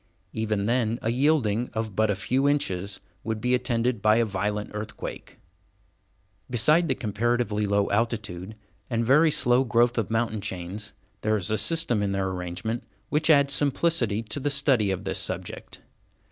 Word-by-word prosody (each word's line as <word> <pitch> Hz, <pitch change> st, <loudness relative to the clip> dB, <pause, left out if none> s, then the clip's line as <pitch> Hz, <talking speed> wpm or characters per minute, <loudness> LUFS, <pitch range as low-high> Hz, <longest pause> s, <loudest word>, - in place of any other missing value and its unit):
Even 110 Hz, -2 st, -1 dB
then 115 Hz, 0 st, +1 dB
a 115 Hz, -, +1 dB
yielding 125 Hz, -4 st, +1 dB
of 110 Hz, -3 st, -3 dB
but 110 Hz, +1 st, +2 dB
a 100 Hz, -, +1 dB
few 130 Hz, +8 st, +1 dB
inches 100 Hz, -9 st, -1 dB, 0.2 s
would 110 Hz, 0 st, -3 dB
be 125 Hz, +3 st, 0 dB
attended 120 Hz, -2 st, 0 dB
by 105 Hz, +1 st, +4 dB
a 115 Hz, 0 st, +3 dB
violent 105 Hz, +1 st, -3 dB
earthquake. 105 Hz, +1 st, -7 dB, 1.1 s
Beside 150 Hz, +9 st, +3 dB
the 130 Hz, -, +1 dB
comparatively 110 Hz, -2 st, -1 dB
low 100 Hz, 0 st, +2 dB
altitude 105 Hz, -3 st, -2 dB, 0.3 s
and 115 Hz, -1 st, 0 dB
very 150 Hz, +6 st, +5 dB
slow 130 Hz, -4 st, +3 dB
growth 120 Hz, -1 st, +2 dB
of 110 Hz, -, -2 dB
mountain 110 Hz, -1 st, -1 dB
chains, 95 Hz, +2 st, -6 dB, 0.3 s
there 110 Hz, 0 st, +1 dB
is 100 Hz, +1 st, -2 dB
a -, -, +2 dB
system 140 Hz, -3 st, +2 dB
in 100 Hz, -1 st, -1 dB
their 95 Hz, -1 st, -1 dB
arrangement 95 Hz, +6 st, -4 dB, 0.3 s
which 155 Hz, +1 st, 0 dB
adds 140 Hz, -2 st, +5 dB
simplicity 135 Hz, -6 st, +1 dB
to 110 Hz, +5 st, -1 dB
the 145 Hz, -, -1 dB
study 135 Hz, -7 st, +2 dB
of 95 Hz, -2 st, -2 dB
this -, -, -1 dB
subject. -, -, -5 dB
110 Hz, 160 wpm, -26 LUFS, 105-125 Hz, 1.1 s, very